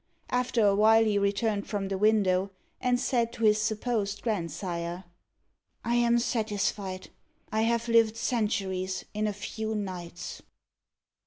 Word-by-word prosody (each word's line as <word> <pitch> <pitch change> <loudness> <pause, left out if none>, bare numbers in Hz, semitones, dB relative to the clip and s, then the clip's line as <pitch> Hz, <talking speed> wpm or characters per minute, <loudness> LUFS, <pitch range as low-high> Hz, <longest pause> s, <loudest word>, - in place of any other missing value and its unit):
After 250 -3 +2
a 200 - +5
while 220 +2 +5
he 210 -2 +2
returned 200 +1 0
from 200 -2 -2
the 195 - -1
window, 200 -3 +3 0.3
and 245 -1 +2
said 235 -3 +1
to 230 - -5
his 215 0 +4
supposed 215 -2 -1
grandsire, 175 -3 -3 0.8
"I 235 - 0
am 240 0 +4
satisfied. 210 -5 -2 0.4
I 220 0 +1
have 235 +1 +1
lived 230 -1 +4
centuries 195 -6 -1
in 215 0 0
a - - 0
few 220 +2 -4
nights." 180 -4 -6
210 Hz, 135 wpm, -28 LUFS, 195-230 Hz, 0.8 s, a